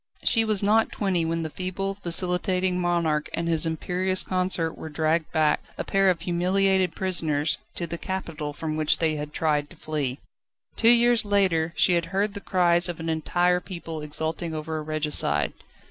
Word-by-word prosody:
She 225 - +3
was 215 -2 +1
not 220 +2 +3
twenty 185 -5 0
when 165 0 -1
the 160 - -5
feeble, 195 +3 -4
vacillating 180 +1 0
monarch 170 -4 0
and 170 - -2
his 165 -1 +1
imperious 185 +3 -1
consort 180 -3 -1
were 160 - -8
dragged 155 +1 0
back 155 -1 +2 0.2
a - - -2
pair 195 -1 +2
of 170 -3 0
humiliated 185 +1 +1
prisoners 160 -5 0 0.2
to 170 - -3
the 170 0 -6
capital 165 -6 -4
from 155 +1 -4
which 155 -1 +5
they 160 -2 +1
had 150 0 -5
tried 150 -2 0
to - - -14
flee. 145 -4 -3 0.6
Two 230 - +4
years 240 0 +5
later, 190 -6 +1
she 180 - +3
had 170 -1 +1
heard 195 +4 -1
the 200 - -6
cries 175 -2 +3
of 175 - -5
an 165 0 -4
entire 175 +3 +1
people 165 -3 -7
exulting 160 +2 -3
over 155 0 -4
a - - -4
regicide. 155 0 0
170 Hz, 175 wpm, -25 LUFS, 160-185 Hz, 0.6 s, which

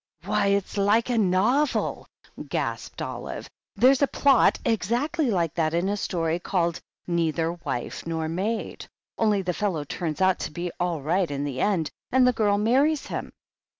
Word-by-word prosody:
"Why, 200 - +1
it's 200 0 0
like 220 +5 +3
a 240 - +1
novel 220 +10 +1 0.2
!" - - -11
gasped - - -3
Olive. - - -6 0.3
"There's 260 +2 +5
a 280 - +5
plot 280 0 +4
exactly 245 - 0
like 170 -7 0
that 160 -1 0
in 175 +3 +1
a 205 - 0
story 170 -4 -1
called 170 -2 -1 0.2
'Neither 165 -1 0
Wife 165 -5 -5
nor 160 -1 -2
Maid.' 195 +7 -3 0.3
Only 210 -3 +2
the 180 0 -1
fellow 180 -6 -1
turns 155 +2 -4
out 190 -1 +3
to - - -4
be 175 +3 -4
all 175 -5 -1
right 175 +4 +1
in 140 0 -3
the 135 -3 -3
end, 185 -7 +1 0.2
and 255 0 +5
the 250 - +4
girl 205 -3 +2
marries 270 +8 +2
him." - - -5
190 Hz, 170 wpm, -25 LUFS, 165-225 Hz, 0.3 s, There's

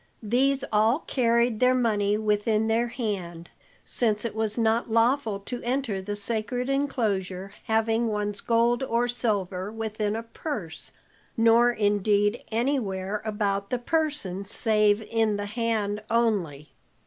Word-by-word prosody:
These 265 +5 +1
all 220 +8 +3
carried 235 -2 +1
their 255 0 +4
money 210 -4 +1
within 215 +1 +1
their 230 +2 +1
hand, 190 -8 -5 0.3
since 215 -2 0
it 230 - -3
was 220 0 -1
not 230 +1 +1
lawful 230 -1 +2
to 245 +4 -6
enter 240 -5 -1
the 205 +2 -4
sacred 230 +4 -2
enclosure 200 -9 -1
having 225 +1 +1
one's 210 -1 -2
gold 235 +1 +2
or 240 -2 +1
silver 205 -5 -2
within 215 -1 -2
a 225 - -4
purse 230 - -6 0.5
nor 230 +1 +5
indeed 205 0 +1
anywhere 210 -5 -1
about 200 -2 -1
the 250 - 0
person 285 - -1
save 210 0 +2
in 220 -1 0
the 205 - -3
hand 215 -1 -1
only. 200 -11 0
220 Hz, 130 wpm, -26 LUFS, 205-235 Hz, 0.5 s, nor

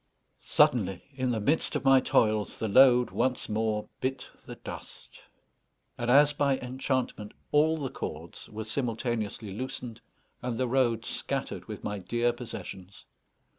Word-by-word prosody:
Suddenly, 95 -7 +3
in 130 -1 -1
the 115 -2 0
midst 145 +10 +1
of - - -2
my 135 0 +7
toils, 110 -4 +1
the 110 - -2
load 125 +2 +6
once 130 -1 0
more 110 0 -1
bit 130 +1 -3 0.2
the - - -7
dust, - - -9 0.7
and, 120 0 -3
as 145 +3 +6
by 140 -2 +2
enchantment, 130 -4 -3 0.2
all 155 +2 +4
the 140 -4 -4
cords 80 +3 -7
were 110 +1 -5
simultaneously 115 -3 -3
loosened, 120 0 -5 0.4
and 120 -2 -3
the 130 0 0
road 120 -3 +1
scattered - - -3
with - - -8
my 105 -1 -3
dear 120 +6 0
possessions. 100 -5 -9
120 Hz, 140 wpm, -29 LUFS, 110-130 Hz, 0.7 s, my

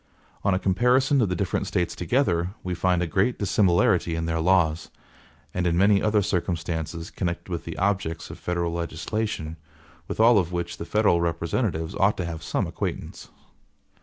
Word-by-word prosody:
On 100 - +2
a - - +2
comparison 125 +8 +3
of 105 - +2
the 90 - -1
different 90 -1 -1
States 90 -1 -1
together, 90 - 0
we 90 - -2
find 90 0 +1
a - - 0
great 95 +9 +1
dissimilarity 90 -4 +2
in 80 0 -2
their 80 0 -1
laws, 85 -2 +2 0.6
and 90 -1 0
in 85 0 +1
many 100 +1 +4
other 105 -1 +2
circumstances 85 -3 -2
connected 85 0 -3
with 85 - -4
the 85 - -6
objects 95 -4 -1
of - - -10
federal 85 -1 -2
legislation, 85 0 -3 0.5
with - - -5
all 115 -1 +6
of 90 -2 -2
which 85 0 -3
the - - -6
federal 105 -4 +2
representatives 85 +1 -1
ought 100 +2 +2
to 90 - -2
have 80 -1 -5
some - - -1
acquaintance. - - -5
90 Hz, 170 wpm, -25 LUFS, 85-100 Hz, 0.6 s, all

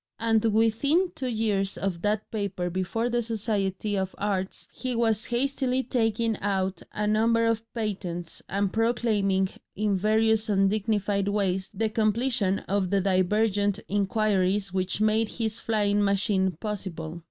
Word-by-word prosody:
And 225 -1 +2
within 230 - +2
two 260 - -4
years 210 -4 0
of 185 -4 -2
that 210 +2 -1
paper 195 -5 -2
before 190 +6 -1
the 240 0 +1
Society 210 -3 -1
of 190 -1 -2
Arts 195 -2 -2
he 255 -2 -4
was 225 -2 +1
hastily 260 +1 0
taking 225 -2 0
out 190 -2 -1
a 210 - -2
number 225 +2 +3
of 230 0 -1
patents 185 -6 -4
and 195 0 0
proclaiming 210 -4 +1 0.3
in 210 -1 +1
various 220 +2 +2
undignified 200 0 +1
ways 190 -2 0
the 225 - -1
completion 215 -1 +1
of 195 -2 0
the 200 +1 +2
divergent 200 +2 +1
inquiries 200 -1 +1
which 185 +1 -1
made 215 +1 +2
his 220 -2 -2
flying 205 -2 +1
machine 195 -1 +1
possible. 175 -6 -5
210 Hz, 135 wpm, -27 LUFS, 195-225 Hz, 0.3 s, number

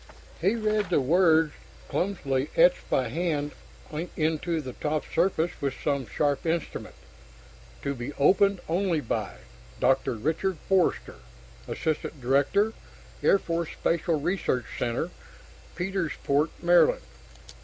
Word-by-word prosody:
He 195 +6 +3
read 215 -3 0
the 175 - +3
words 160 +1 +4 0.3
clumsily 145 -8 -1
etched - - +4
by 125 -3 +1
hand 150 -1 -1 0.7
into 160 +1 0
the 130 -4 -6
top 150 +3 -2
surface 170 -1 +2
with 140 -2 -1
some 140 -4 0
sharp 145 +5 0
instrument: 165 0 -3 0.9
TO 140 - -1
BE 125 +1 -5
OPENED 195 +6 +3
ONLY 170 -1 +1
BY: 120 - -3 0.4
Dr. 130 -1 +2
Richard 160 - -1
Forster, 190 -3 +1 0.5
Assistant 155 -1 -2
Director, 140 - +2 0.5
Air - - +5
Force 170 -3 -2
Special 165 -1 0
Research 145 - 0
Center, 125 +8 -1 0.6
Petersport, 165 -5 0
Md. 175 - +5
160 Hz, 110 wpm, -27 LUFS, 140-185 Hz, 0.9 s, Air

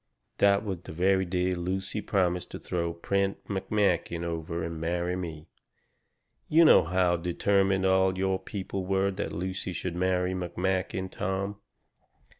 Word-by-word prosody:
That 100 +1 +4
was 95 -4 -3
the 85 - -10
very 95 +3 +2
day 90 +1 0
Lucy 95 +4 -2
promised 90 -4 0
to - - -7
throw 85 -1 -2
Prent 100 +3 0
McMakin 95 -4 0
over 85 0 -3
and 80 -1 -5
marry 85 +2 -1
me. 80 -4 -6 1.0
You 165 +2 +6
know - - +7
how 90 +1 +2
determined 95 +2 +1
all 95 0 +3
your 95 0 +1
people 95 -1 -5
were 95 +1 +1
that 100 +2 -4
Lucy 95 +2 -3
should 85 0 -4
marry 90 0 +1
McMakin, 95 +1 -2
Tom. 95 +2 -2
95 Hz, 140 wpm, -28 LUFS, 85-95 Hz, 1.0 s, know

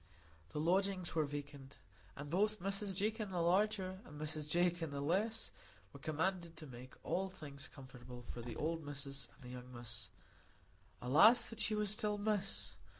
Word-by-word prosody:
The - - -3
lodgings 185 +2 +2
were 160 -1 +3
vacant, 140 -1 -6 0.4
and 145 +1 -6
both 210 +4 +3
Mrs 195 +1 -1
Jakin 215 +2 0
the 180 -2 -1
larger 190 +1 +2
and 150 - -10
Mrs 155 0 -2
Jakin 175 0 +3
the 140 0 -3
less 195 +10 +1 0.4
were - - -9
commanded 170 +2 -1
to 155 - -7
make 130 -1 -10
all 190 +1 0
things 145 -5 -6
comfortable 125 -2 -10
for 120 - -6
"the 115 -1 -5
old 165 +4 -1
Missis 140 -1 -4
and - - -17
the 125 - -8
young 125 0 -8
Miss"; 120 -1 -3 0.9
alas 205 - +8
that 225 - -6
she 215 - +3
was 210 -1 +1
still 210 -1 0
"Miss!" 205 -1 0
165 Hz, 165 wpm, -38 LUFS, 140-195 Hz, 0.9 s, alas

